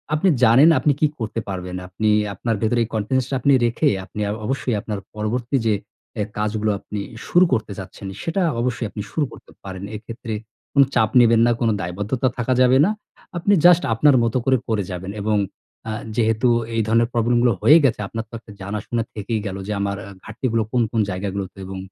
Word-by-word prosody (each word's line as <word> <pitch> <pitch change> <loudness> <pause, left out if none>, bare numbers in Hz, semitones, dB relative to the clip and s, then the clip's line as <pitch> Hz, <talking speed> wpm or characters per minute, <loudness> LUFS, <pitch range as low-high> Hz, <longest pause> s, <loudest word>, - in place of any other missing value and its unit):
আপনি 185 +5 +2
জানেন 130 +9 +7
আপনি 145 +3 +3
কি 155 - +4
করতে 110 0 -3
পারবেন? 90 -1 -5
আপনি 105 +4 -1 0.2
আপনার 115 +4 -2
ভেতরে 115 +2 +2
কনফিডেন্স 120 +4 0
টা 135 - -1
আপনি 140 - +3
রেখে, 120 +6 +1 0.2
আপনি 105 - -9 0.3
অবশ্যই 130 -2 -1
আপনার 105 -3 -4 0.2
পরবর্তী 120 +5 -2
যে, 110 - +3 0.4
অ্যা 105 -3 -1
কাজগুলো 105 0 0
আপনি 105 - -6 0.3
শুরু 180 +1 +5
করতে 110 -4 -1
চাচ্ছেন, 95 +1 -8 0.2
সেটা 170 +4 -1 0.2
অবশ্যই 120 -2 -1
আপনি 105 - -6
শুরু 150 - 0
করতে - - -14
পারেন। 95 -1 -7
এক্ষেত্রে 115 +1 -7 0.4
কোনো 140 -1 +6
চাপ 110 -1 +3
নিবেন 115 -1 +5
না, 120 - +3
কোনো 115 -1 +3
দায়বদ্ধতা 100 +9 -2
থাকা 120 +2 0
যাবে 130 +1 +5
না। - - +2 0.5
আপনি 200 +4 +2
জাস্ট 175 0 +7
আপনার 140 +4 +4
মত 115 +1 -1
করে, 130 -1 +4
করে 105 -3 +1
যাবেন। 90 +2 -5
এবং 105 -1 +1 0.5
আ 110 - -2 0.2
যেহেতু 115 +2 +2 0.3
এই 115 - +2
ধরনের 115 +1 +3
প্রবলেম 120 +1 +2
গুলো 120 - +4
হয়ে 155 - +7
গেছে 120 - +2
আপনার 115 +1 -5
তো - - -30
একটা 110 - -15
জানাশুনা 105 +4 -3
থেকেই 110 +1 -3
গেলো। 95 0 -4
যে, - - -3
আমার 100 0 -1 0.3
ঘাটতিগুলো 115 0 -1
কোন, 125 -2 +2
কোন 115 - +1
জায়গাগুলোতে? 95 +1 -4
এবং 95 0 -7
115 Hz, 190 wpm, -21 LUFS, 105-125 Hz, 0.5 s, জানেন